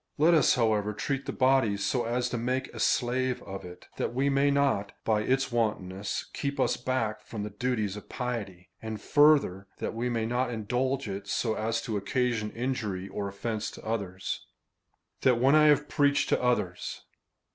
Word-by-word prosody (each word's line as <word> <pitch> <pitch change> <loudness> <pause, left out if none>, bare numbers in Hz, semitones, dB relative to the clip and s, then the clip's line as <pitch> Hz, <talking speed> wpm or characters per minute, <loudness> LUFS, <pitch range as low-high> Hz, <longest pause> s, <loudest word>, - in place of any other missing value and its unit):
Let 160 +3 +5
us, 155 -5 +5
however, 110 -3 +1
treat 135 +6 -3
the - - -1
body 130 -6 +3
so 100 +5 0
as 120 +2 0
to 120 - -2
make 130 +3 -2
a - - -8
slave 125 +1 +1
of 95 0 -7
it,^ 90 0 -11
that 120 - -2
it 140 +1 +3
may 140 +1 +3
not, 140 -8 +1
by 110 -1 +2
its 135 +4 +1
wantonness, 105 -4 -1
keep 140 0 -3
us - - +2
back 115 -4 -2
from 110 -3 -6
the 105 - -5
duties 110 -2 -1
of 105 - -10
piety; 105 -8 -5
and 110 -1 -5
farther, 145 -11 +4
that - - -3
we 120 +2 -2
may 115 -2 -1
not 125 +2 0
indulge 125 +4 -1
it, 100 0 -5
so 110 +3 0
as 115 +1 -1
to 110 -3 -2
occasion 110 +1 0
injury, 110 -6 -3
or 100 -1 -4
oifence, 110 +2 -3
to - - -12
others. 100 -4 -3 0.7
That, 125 -2 +4
when 135 +3 +4
I 155 0 +6
have 150 0 +4
preached 145 -1 +2
to - - +2
others. 120 -8 -1
115 Hz, 180 wpm, -29 LUFS, 105-130 Hz, 0.7 s, I